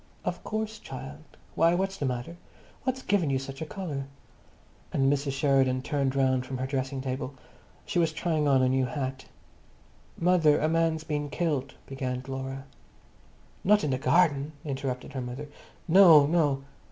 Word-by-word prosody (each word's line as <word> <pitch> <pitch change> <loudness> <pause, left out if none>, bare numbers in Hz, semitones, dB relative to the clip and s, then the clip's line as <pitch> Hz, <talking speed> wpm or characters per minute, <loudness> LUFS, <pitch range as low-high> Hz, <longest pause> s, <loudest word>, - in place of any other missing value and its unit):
"Of - - -3
course, 220 0 -3
child. 135 +3 -8 0.3
Why, 165 +1 +4
what's 195 +1 -1
the 140 - -1
matter? 125 +6 -4 0.5
What's 260 0 -1
given 190 -7 +1
you 135 - +1
such 135 +1 -7
a 160 - -3
colour?" 155 -8 -4 0.9
And 135 +1 +3
Mrs. 140 -1 -2
Sheridan 135 -2 +2
turned 140 -2 -1
round 130 -2 +2
from 130 0 -5
her 130 - -2
dressing 135 0 -2
table. 130 +1 -4 0.5
She - - 0
was 165 -2 +2
trying 160 -2 0
on 135 -2 +4
a 130 - +3
new 130 0 +2
hat. 130 -2 -4 0.9
"Mother, 165 -4 +4
a 155 - +1
man's 165 -1 +1
been 150 -2 -3
killed," 145 -5 -2
began 130 -2 -4
Laura. 135 0 -5 1.0
"Not 210 +2 +4
in 150 - 0
the 130 - 0
garden?" 150 -2 +2
interrupted 135 -3 -4
her 130 - -3
mother. 125 +4 -6 0.4
"No, 165 -4 +8
no!" 145 -4 +1
140 Hz, 160 wpm, -28 LUFS, 130-165 Hz, 1.0 s, No